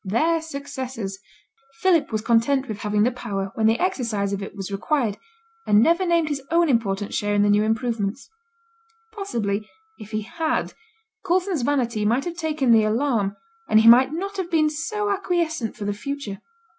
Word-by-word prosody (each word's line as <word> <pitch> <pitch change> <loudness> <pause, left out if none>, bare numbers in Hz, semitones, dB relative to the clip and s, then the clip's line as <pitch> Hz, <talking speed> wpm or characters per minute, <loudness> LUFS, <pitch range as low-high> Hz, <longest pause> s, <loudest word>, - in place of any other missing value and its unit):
'Their 315 - +1
successors.' 265 -9 -6 0.6
Philip 350 -8 +3
was 215 -1 -2
content 245 +4 +2
with 215 -2 -5
having 210 0 +1
the 245 - +2
power 195 -6 -4
when 220 -1 +2
the 225 +1 +3
exercise 225 - -1
of 200 - -3
it 195 - -7
was 195 -1 -6
required, 220 +1 0 0.5
and 210 0 +5
never 340 - +3
named 335 -2 +2
his 285 -2 -2
own 335 -1 +3
important 205 -5 0
share 205 0 0
in 205 - +4
the 205 - +3
new 205 0 +4
improvements. 225 +1 -1 0.9
Possibly, 215 - -3 0.3
if 210 - -10
he 215 -1 -3
had, 320 +8 -2 0.5
Coulson's 365 -3 0
vanity 240 -5 0
might 235 +6 +1
have 345 -1 -4
taken 310 -6 0
the 225 -1 +6
alarm, 215 -3 0 0.3
and 215 - +6
he 225 - +4
might 255 +4 +7
not 395 +5 -4
have 370 -3 -3
been 310 -3 +2
so 415 +7 -3
acquiescent 340 - -1
for 210 - -5
the 205 - -1
future. 230 -2 -5
240 Hz, 175 wpm, -23 LUFS, 210-320 Hz, 0.9 s, might